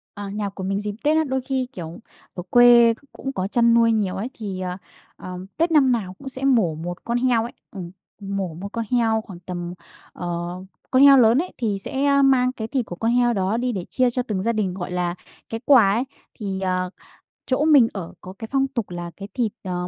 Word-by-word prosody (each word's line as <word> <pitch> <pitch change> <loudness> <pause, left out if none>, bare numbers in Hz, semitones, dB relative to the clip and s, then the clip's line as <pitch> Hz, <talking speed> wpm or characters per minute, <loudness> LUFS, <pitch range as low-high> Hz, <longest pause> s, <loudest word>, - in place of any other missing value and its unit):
Ờ, 205 -1 -6
nhà 205 0 -3
của 190 -1 -7
mình 195 +1 -1
dịp 210 -1 -4
Tết 305 +1 +3
á, 315 - +3
đôi 265 -2 -1
khi, 260 0 -2
kiểu, 165 0 -7 0.4
ở 180 - -5
quê 240 -1 +7
c - - -23 0.2
cũng 270 - -5
có 190 -4 -2
chăn 235 +1 +3
nuôi 230 -1 +5
nhiều 205 -4 0
ấy, 220 +6 -3
thì, 195 -4 -5
ờ, 180 0 -3 0.4
ờ, 180 0 -8 0.2
Tết 335 +1 +1
năm 275 -5 +5
nào 190 -6 -2
cũng 275 - -8
sẽ 265 +1 -6
mổ 225 - +3
1 175 +3 -7
con 235 +1 0
heo 240 -3 +2
ấy, 235 - -6 0.2
ừm, 180 -4 -7 0.3
mổ 195 -4 -3
1 195 +4 -6
con 230 -1 -2
heo 225 -3 +2
khoảng 195 -6 -11
tầm, 175 0 -6 0.4
ờ 175 - -7 0.6
con 260 +1 +5
heo 280 -1 +9
lớn 235 0 +5
ấy 360 +3 -2
thì 210 -5 -1
sẽ, 270 +7 -3
ơ, 280 0 +4
mang 255 -2 +4
cái 220 -3 -6
thịt 255 -3 -1
của 175 - -7
con 225 +4 0
heo 240 -1 +3
đó 195 +1 0
đi 245 +1 -1
để 185 -5 -4
chia 255 -1 +2
cho 250 +1 -1
từng 210 -6 -3
gia 230 +2 +1
đình, 200 -5 -1
gọi 180 -2 -5
là, 175 -1 -1 0.3
cái 225 0 -5
quà 235 -9 +6
ấy. 235 +5 +1 0.3
Thì, 195 -3 -4
ờ, 185 -1 -1 0.6
chỗ 275 +4 +1
mình 280 -7 +6
ở 185 -5 -6
có 185 - -9
cái 225 - -6
phong 270 0 +2
tục 235 -8 -4
là 175 -1 -6
cái 200 0 -7
thịt, 230 -5 0
ờ, 180 -1 -3
220 Hz, 240 wpm, -23 LUFS, 185-250 Hz, 0.6 s, heo